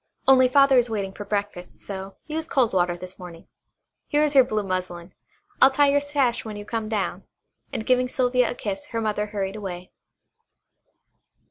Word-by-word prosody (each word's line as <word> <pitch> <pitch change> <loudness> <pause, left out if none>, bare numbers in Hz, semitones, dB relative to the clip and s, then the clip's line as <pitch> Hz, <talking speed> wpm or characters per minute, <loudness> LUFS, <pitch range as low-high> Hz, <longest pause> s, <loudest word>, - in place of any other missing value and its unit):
Only 260 -1 +7
Father 275 0 +5
is 240 -1 0
waiting 200 -3 -3
for 205 - -8
breakfast, 200 -3 -4
so 195 -1 -7
use 315 +1 -4
cold 255 -9 +1
water 175 -1 +1
this 185 +1 -9
morning. 175 -2 -11 0.6
Here 295 +1 +2
is 300 -1 +1
your 270 -2 +7
blue 215 -4 -2
muslin 185 -2 -4 0.5
I'll 265 - +9
tie 285 +1 +3
your 285 0 +3
sash 280 -4 0
when 215 -2 -7
you 205 0 -8
come 220 0 -3
down," 210 -3 -2 0.5
and 220 - -4
giving 250 0 +2
Sylvia 250 -1 +1
a - - -4
kiss 205 +4 -5
her 230 -5 -3
mother 210 -1 -1
hurried 200 -1 -3
away. 180 -3 -7
215 Hz, 175 wpm, -24 LUFS, 195-260 Hz, 0.6 s, I'll